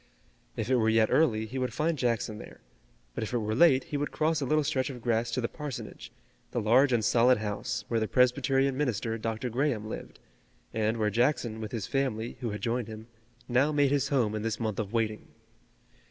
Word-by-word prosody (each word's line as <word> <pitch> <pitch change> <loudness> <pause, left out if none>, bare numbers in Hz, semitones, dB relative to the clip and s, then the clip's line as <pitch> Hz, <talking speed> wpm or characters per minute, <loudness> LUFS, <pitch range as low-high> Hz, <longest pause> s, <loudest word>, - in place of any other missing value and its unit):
If 110 - -2
it 130 0 +3
were 110 -2 +2
yet 110 0 +3
early 110 -9 +3
he 130 +4 -5
would 125 -1 -2
find 165 +2 +1
Jackson 115 -5 -1
there, - - -11 0.5
but - - -3
if 110 - -5
it - - +2
were 110 -1 -2
late 135 0 +5
he 145 - -4
would 145 +1 -2
cross 155 0 0
a 135 - -1
little 155 +2 +2
stretch 130 -1 0
of 130 -3 -7
grass 115 0 0
to 125 +2 -1
the 115 - 0
parsonage, 150 -2 -7 0.4
the - - -2
large 125 +5 +4
and 115 -3 +2
solid 125 +3 +4
house, 105 0 -3
where 115 - 0
the 110 - -1
Presbyterian 135 +2 +2
minister, 115 -5 -1
Dr. 115 +2 -3
Graham, 120 -4 0
lived, - - -7 0.6
and 110 +1 0
where 105 -1 +1
Jackson, 120 -1 0
with 110 - -5
his 110 -6 -3
family, 125 -4 -2
who 120 -3 -3
had 105 0 -5
joined 120 -1 -1
him, 110 +1 -9 0.4
now 130 +5 +3
made 145 -2 +2
his 145 -2 +1
home 120 -7 +1
in 110 - -2
this 110 0 -2
month 110 -3 -2
of 105 -2 -3
waiting. 110 -2 -1
120 Hz, 210 wpm, -29 LUFS, 110-135 Hz, 0.6 s, late